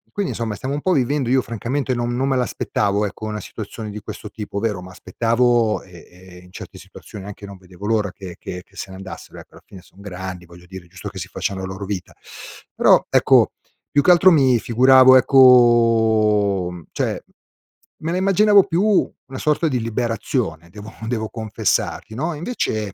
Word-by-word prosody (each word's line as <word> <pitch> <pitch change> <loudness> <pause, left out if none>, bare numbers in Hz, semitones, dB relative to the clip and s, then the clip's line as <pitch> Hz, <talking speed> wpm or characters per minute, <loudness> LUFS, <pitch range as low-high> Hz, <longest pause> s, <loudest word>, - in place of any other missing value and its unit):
quindi 200 -3 -2
insomma 110 -3 -4
stiamo 130 +6 -5
un - - -2
po' 185 - +1
vivendo 135 -1 0
io 130 +1 +3
francamente 125 +4 -3
non 120 0 -2
non 135 +2 0
me 130 - +1
l'aspettavo 105 -4 -1
ecco, 105 +2 -7
una 105 0 -4
situazione 110 0 -8
di 105 +1 -7
questo 105 0 -9
tipo. 105 -2 -6
Vero 105 -4 -2
m'aspettavo 115 +3 0
e 90 -3 -15
e 90 0 -16
in 90 - -18
certe - - -10
situazioni 100 -2 -12
anche 100 0 -9
non 100 -1 -10
vedevo 95 +1 -12
l'ora 105 -3 0
che 95 -4 -10
che 90 0 -7
se 95 0 -8
ne - - -9
andassero 95 0 -10
ecco, - - -16
alla - - -17
fine 95 - -13
son 95 +1 -23
grandi 95 -2 -7
voglio 85 +1 -16
dire, 95 -1 -10
è - - -21
giusto 90 +1 -9
che - - -12
si - - -6
facciano 95 -1 -4
la - - -4
loro 95 +1 -7
vita; 95 -3 -5 0.6
però - - +4
ecco, - - +4 0.4
più 145 - +3
che 180 - +5
altro 180 +2 +6
mi 135 -6 +4
figuravo 130 +3 +6
ecco 115 -6 +4
mhmm, 90 -2 -10
cioè, - - -2 0.8
me 160 +1 -3
la 180 - -1
immaginavo 200 +2 +4
più 180 0 0 0.4
una 130 0 -8
sorta 155 +2 +1
di 130 -5 -1
liberazione 115 - -3
devo 105 +4 -11
devo 110 -2 -3
confessarti 110 -1 -2
no, 160 +8 -2
e - - -8
invece 110 - -3
110 Hz, 190 wpm, -20 LUFS, 95-130 Hz, 0.8 s, altro